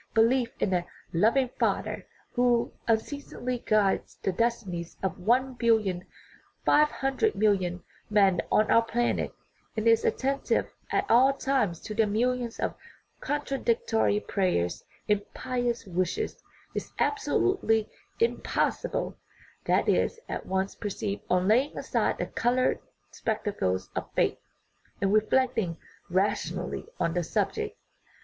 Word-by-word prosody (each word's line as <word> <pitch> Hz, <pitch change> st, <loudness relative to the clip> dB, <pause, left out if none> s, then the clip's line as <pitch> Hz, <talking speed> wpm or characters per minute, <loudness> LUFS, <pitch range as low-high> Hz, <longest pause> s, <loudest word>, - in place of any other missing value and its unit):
Belief 230 Hz, +2 st, +4 dB
in 190 Hz, -, +1 dB
a 175 Hz, -1 st, +2 dB, 0.2 s
" -, -, -33 dB
loving 250 Hz, +3 st, +3 dB
Fa -, -, +2 dB
ther," -, -, -6 dB, 0.3 s
who 245 Hz, -1 st, +2 dB
unceasingly 250 Hz, +1 st, -1 dB
guides 210 Hz, -4 st, +1 dB
the 195 Hz, -, +1 dB
destinies 185 Hz, -5 st, -2 dB
of 190 Hz, -1 st, -2 dB
one 255 Hz, +7 st, +2 dB
bill 235 Hz, -2 st, +4 dB
ion 185 Hz, -4 st, -4 dB, 0.6 s
five 300 Hz, 0 st, +5 dB
hundred 270 Hz, +13 st, 0 dB
million 185 Hz, -4 st, +1 dB, 0.3 s
men 195 Hz, -4 st, +4 dB
on 215 Hz, -, +3 dB
our 230 Hz, -, +7 dB
planet, 235 Hz, +1 st, 0 dB, 0.5 s
and 220 Hz, +1 st, 0 dB
is 230 Hz, 0 st, +5 dB
attentive 275 Hz, +1 st, 0 dB, 0.2 s
at -, -, +1 dB
all 260 Hz, +4 st, +6 dB
times 260 Hz, -, 0 dB
to 215 Hz, -, -6 dB
their 220 Hz, 0 st, +2 dB
millions 240 Hz, +2 st, 0 dB
of -, -, -1 dB, 0.5 s
contradictory 235 Hz, -7 st, 0 dB
prayers 180 Hz, -, 0 dB, 0.2 s
and 210 Hz, -1 st, +2 dB
pious 245 Hz, -2 st, -2 dB
wishes, 185 Hz, -, -2 dB, 0.3 s
is -, -, -5 dB
absolutely 375 Hz, -, +1 dB, 0.3 s
impossible; 460 Hz, +1 st, 0 dB, 0.5 s
that -, -, +2 dB
is 465 Hz, -, +2 dB
at -, -, -5 dB
once 190 Hz, +1 st, 0 dB
perceived 205 Hz, 0 st, -4 dB
on 180 Hz, +1 st, +2 dB
laying 250 Hz, +7 st, +3 dB
aside -, -, 0 dB
the -, -, -1 dB
colored 250 Hz, +2 st, +1 dB, 0.3 s
spectacles 95 Hz, -, -2 dB
of -, -, -4 dB
" -, -, -35 dB
faith -, -, +2 dB, 0.3 s
" -, -, -36 dB
and 195 Hz, 0 st, +1 dB
reflecting 220 Hz, -5 st, +2 dB, 0.3 s
rationally 185 Hz, -2 st, -1 dB
on 165 Hz, -2 st, +1 dB
the 175 Hz, 0 st, 0 dB
subject. -, -, -1 dB
225 Hz, 130 wpm, -28 LUFS, 190-250 Hz, 0.6 s, our